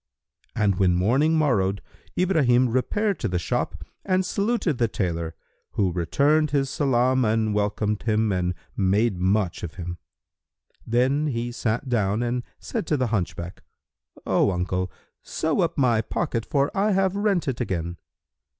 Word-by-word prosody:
And 100 -3 +1
when 90 -2 +4
morning 135 - +3
morrowed 100 -10 +2 0.4
Ibrahim 135 -9 +3
repaired 200 - 0
to 115 - -1
the 90 -3 -1
shop 85 - -2 0.2
and 185 0 +1
saluted 200 - 0
the 120 - +3
tailor, 85 -6 -3 0.4
who 95 -3 +1
returned 140 - +2
his 140 -2 0
salam 130 -2 +2
and 110 -1 +1
welcomed 105 0 0
him 110 -1 +1
and 90 -1 0 0.2
made 100 +1 +1
much 95 0 +1
of 85 - -6
him. 90 -1 -6 0.9
Then 130 +6 +2
he 120 -3 -2
sat 120 +2 -2
down 110 -2 +1
and 120 +1 -1 0.2
said 225 -8 -4
to 150 - +1
the 125 -4 -1
hunchback, 85 -3 -3 0.6
"O - - +3
uncle, 90 0 -1 0.3
sew 160 +4 -1
up 170 -2 0
my 120 -5 +3
pocket, 115 -1 -2
for 140 0 0
I 205 +1 +2
have 190 0 +2
rent 200 -5 +1
it 130 -2 -2
again." 85 -6 -3
120 Hz, 150 wpm, -24 LUFS, 95-145 Hz, 0.9 s, when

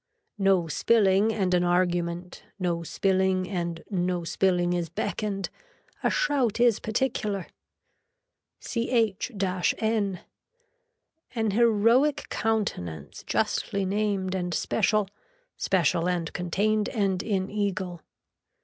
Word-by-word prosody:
No 195 -3 +3
spilling 200 +4 +3
and 190 -4 0
an 180 0 +3
argument, 175 0 0 0.2
no 175 -3 -1
spilling 190 +1 +1
and 170 -3 -3
no 180 -2 0
spilling 175 0 +1
is 175 -2 -2
beckoned. 195 +1 -3 0.5
A - - +3
shout 280 - +1
is 235 -3 +4
particular. 215 -4 -1 1.1
CH 230 -3 0 0.5
N. 210 -5 0 1.1
An 220 -2 +1
heroic 235 +6 +3
countenance 90 - -2
justly 200 -1 0
named 195 -1 -1
and 180 -3 -2
special, 205 - +1 0.5
special 175 -1 +1
and 175 -2 -2
contained 205 +4 0
and 195 -4 0
in 195 -3 -1
eagle. 190 -4 -2
190 Hz, 100 wpm, -27 LUFS, 175-215 Hz, 1.1 s, is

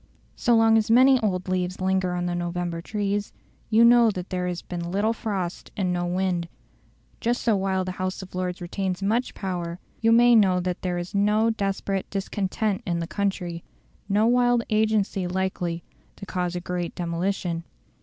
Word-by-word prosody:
So 240 - +2
long 225 0 +5
as 215 - -2
many 260 +3 +6
old 185 -4 -1
leaves 185 0 -1
linger 185 -1 +1
on 175 0 -2
the 175 - -1
November 175 -1 -3
trees, 205 +1 -2 0.4
you 225 +1 +6
know 235 -1 +6
that 185 -3 -5
there 180 -1 -1
has 175 -1 -4
been 170 -1 -5
little 210 +4 +1
frost 195 -6 -4
and 185 -3 0
no 175 0 -1
wind; 180 -1 -1 0.7
just 240 +1 0
so 225 -3 +3
while 190 -1 0
the 185 - -3
House 185 +1 -2
of 190 - -13
Lords 180 0 -3
retains 185 +1 -3
much 230 +5 0
power, 175 -3 -4 0.2
you 225 0 +4
may 240 +1 +6
know 190 -4 +4
that 180 0 -3
there 180 -1 -1
is 175 +3 -5
no 210 +3 +3
desperate 195 -2 -2
discontent 200 +1 -2
in 170 -1 -1
the 170 - -2
country, 180 -3 -2 0.5
no 205 +2 +3
wild 245 0 +3
agency 215 -3 +1
likely 180 -2 -2 0.3
to - - -9
cause 180 -1 -2
a 175 - -3
great 175 -1 -4
demolition. 170 0 -2
190 Hz, 175 wpm, -25 LUFS, 180-215 Hz, 0.7 s, many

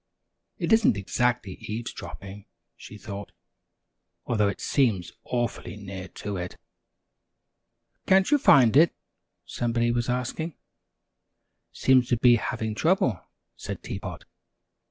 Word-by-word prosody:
"It - - +1
isn't 225 - +4
exactly 115 0 -1
eavesdropping," 105 -2 -7 0.3
she 105 - -11
thought, 100 -1 -8 0.9
"although 105 -4 +1
it 100 - -3
seems 110 - +1
awfully 120 -3 -3
near 95 -2 -8 0.2
to 100 -1 -2
it." 90 0 -6 1.5
"Can't 190 +5 +4
you 295 - +5
find 130 - +6
it?" 160 +4 +5 0.5
somebody 120 0 0
was 120 0 -1
asking. 130 +6 -2 1.2
"Seems 130 -2 +3
to 120 - +2
be 120 0 +6
having 110 0 -3
trouble," 130 - +1 0.3
said - - -7
Tea - - -5
Pot. - - -8
120 Hz, 115 wpm, -26 LUFS, 100-130 Hz, 1.5 s, find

